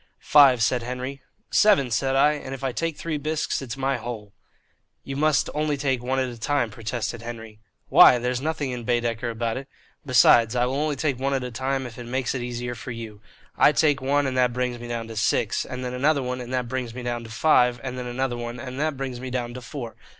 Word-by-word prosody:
"Five," 135 -5 +7
said 125 +1 +1
Henry. 125 +3 -5 0.3
"Seven," 195 - +4
said 135 +4 +1
I; 145 +2 +5
"and 135 -2 -6
if 135 - -11
I 135 - 0
take 165 +4 -2
three 155 -3 -3
bisques 155 0 -2
it's 135 0 -6
my 135 0 0
hole." 110 -4 -7 0.7
"You 135 - -6
must 155 +1 +2
only 150 -1 0
take 135 -3 0
one 130 +2 -1
at 130 -1 +1
a 120 -2 -8
time," 120 -1 0
protested 115 +1 -4
Henry. 115 -2 -8 0.3
"Why? 125 - +8
There's 125 +1 -2
nothing 150 -3 -2
in 125 -1 -5
Baedeker 120 -1 -1
about 115 0 -2
it. 135 +1 -7 0.4
Besides, 120 -3 +5
I 120 0 +2
will 125 - -2
only 150 +1 0
take 140 -3 -1
one 135 +1 0
at 130 - -2
a 125 - -5
time 130 +2 -2
if 120 -1 -9
it 120 - -7
makes 125 +1 -2
it 130 - -3
easier 120 0 -4
for 120 +2 -9
you. 115 -3 -7 0.3
I 150 - +5
take 145 -2 +2
one, 140 +2 +1
and 130 -1 -2
that 125 -1 +2
brings 125 -1 -2
me 120 - -8
down 115 -1 -4
to 115 - -8
six, 110 - +1
and 125 0 -6
then 125 - -4
another 140 +2 +2
one 125 0 -3
and 120 0 -8
that 125 -2 -1
brings 125 -2 -4
me 125 - -6
down 120 -1 -3
to - - -10
five, 125 0 +3
and 130 -1 -4
then 125 -1 -5
another 125 0 -2
one 120 0 -5
and 125 +2 -6
that 155 -2 -1
brings 130 -2 -4
me 130 +1 -6
down 120 -1 -3
to 125 - -7
four. 125 -3 -7
125 Hz, 240 wpm, -24 LUFS, 120-135 Hz, 0.7 s, Why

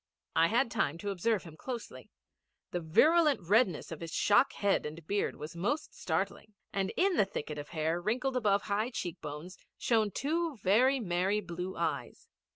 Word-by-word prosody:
I 165 - +5
had 235 +4 +2
time 165 -9 0
to 200 +3 -3
observe 200 +2 0
him 165 -3 -11
closely. 240 +7 -7 0.6
The 175 - -1
virulent 300 - +4
redness 205 -6 +2
of 165 - -6
his 165 -1 -6
shock 205 +10 +4
head 200 -1 +1
and 155 +1 -7
beard 200 +4 -1
was 155 +3 -8
most 210 - -2
startling; 215 - -3 0.2
and 195 -1 0
in 375 0 +3
the 205 - +5
thicket 150 -5 -5
of 145 - -8
hair 160 +1 -1
wrinkled 255 +7 -1
above 205 -5 +2
high 210 +3 0
cheek 180 -9 -5
bones 150 +5 -7 0.2
shone 220 -3 +2
two 310 - -1
very 240 +8 +3
merry 190 0 +1
blue 180 -1 -5
eyes. - - -3
200 Hz, 170 wpm, -31 LUFS, 170-240 Hz, 0.6 s, I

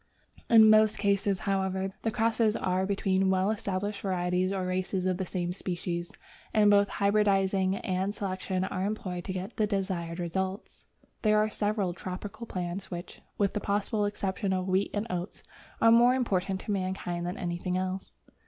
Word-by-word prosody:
In 225 -2 +8
most 215 0 +5
cases, 200 -1 +1
however, 190 -1 -1
the 225 - 0
crosses 225 0 +2
are 185 +1 0
between 195 -1 +1
well 190 +2 +2
established 205 -1 -3
varieties 180 -1 0
or 190 -2 -1
races 185 0 -1
of 185 -1 +1
the 190 -1 -3
same 175 -1 -2
species, 175 -2 -4 0.4
and 210 -1 +6
both 200 0 +5
hybridizing 195 -2 +2
and 190 +2 -2
selection 190 -1 -2
are 190 0 -2
employed 185 -4 -3
to 190 - -3
get 185 +4 -6
the 215 - +2
desired 185 -4 -2
result. 190 +3 -2 0.5
There 215 -1 +4
are 215 0 +2
several 205 -4 0
tropical 190 +6 -7
fruits 180 0 -4
which, 175 0 -7 0.2
with 200 -2 +1
the - - -1
possible 205 +1 0
exception 200 -1 -2
of 185 0 -1
wheat 190 +1 +1
and 205 +1 -2
oats, 180 +1 -5 0.4
are 230 - +6
more 240 +2 +6
important 190 -6 0
to - - -4
mankind 185 -3 -2
than 180 - -4
anything 175 +1 -2
else. 185 +1 -4
190 Hz, 165 wpm, -29 LUFS, 185-205 Hz, 0.5 s, In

